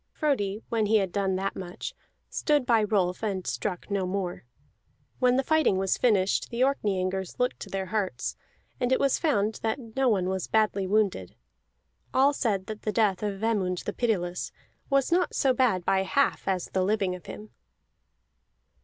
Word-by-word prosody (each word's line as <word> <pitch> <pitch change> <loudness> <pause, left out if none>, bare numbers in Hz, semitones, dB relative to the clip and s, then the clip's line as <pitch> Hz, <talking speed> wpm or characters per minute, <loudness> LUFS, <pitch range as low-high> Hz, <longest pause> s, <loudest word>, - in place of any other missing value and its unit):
Frodi, 220 - -1
when 220 -2 +1
he 220 +1 +4
had 195 -3 0
done 195 -1 0
that 195 +1 -2
much, 180 -1 -6 0.3
stood 295 -4 +1
by 230 -3 +4
Rolf 190 -4 +1
and 195 -4 -2
struck 200 0 -3
no 195 -2 0
more. 185 -6 -3 0.7
When 250 -1 +4
the 265 - +2
fighting 315 -10 +3
was 190 0 +1
finished 200 -6 +2
the 235 +1 -3
Orkneyingers 190 -8 -1
looked 250 0 0
to - - -8
their 195 -1 -2
hurts, 190 - -2 0.4
and 250 0 0
it 260 - +3
was 275 -2 +2
found 220 -9 +1
that 225 0 -3
no 265 -1 +3
one 190 -5 +1
was 190 -1 -2
badly 210 -3 +1
wounded. 200 - 0 0.8
All 275 +2 +5
said 205 -8 0
that 215 0 -7
the 215 - -1
death 205 -4 +2
of 205 -2 -2
Vemund 195 -5 0
the - - -3
Pitiless 180 -7 -1 0.4
was 275 +2 +2
not 355 +1 +2
so 265 -2 +3
bad 230 -9 +2
by 190 - +3
half 280 +8 +1
as 185 -2 -1
the 190 - +2
living 195 -1 +1
of 180 - -10
him. 210 0 -9
205 Hz, 175 wpm, -27 LUFS, 190-245 Hz, 0.8 s, All